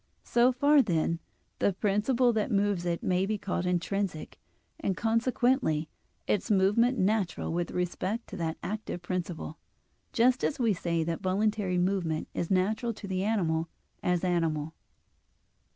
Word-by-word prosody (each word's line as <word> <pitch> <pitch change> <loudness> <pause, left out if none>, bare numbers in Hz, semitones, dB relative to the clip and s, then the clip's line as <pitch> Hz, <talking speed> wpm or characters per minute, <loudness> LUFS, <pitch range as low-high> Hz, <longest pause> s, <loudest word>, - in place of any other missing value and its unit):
So 240 +1 +4
far, 285 +3 +5
then, 170 -5 0 0.4
the 200 - +2
principle 220 +6 +2
that 215 -2 0
moves 200 -3 +1
it 170 -1 -1
may 185 +1 +1
be 215 0 0
called 180 -2 -2
intrinsic, 180 -1 -2 0.4
and 195 - -1
consequently 230 - +1 0.4
its 210 - 0
movement 210 +6 +3
natural 195 -4 0
with 175 0 -1
respect 185 +5 -2
to 200 - -7
that 165 -2 -2
active 205 -4 -4
principle; 175 -3 -4 0.5
just 250 +2 +3
as 290 - 0
we 230 -5 +2
say 170 -2 -1
that 165 0 -3
voluntary 195 0 0
movement 180 -4 0
is 170 - -2
natural 215 +5 +1
to 210 - -8
the 190 -1 -1
animal 170 -6 0 0.3
as 180 -1 0
animal 165 -4 0
(Phys. - - -37
190 Hz, 145 wpm, -29 LUFS, 175-220 Hz, 0.5 s, far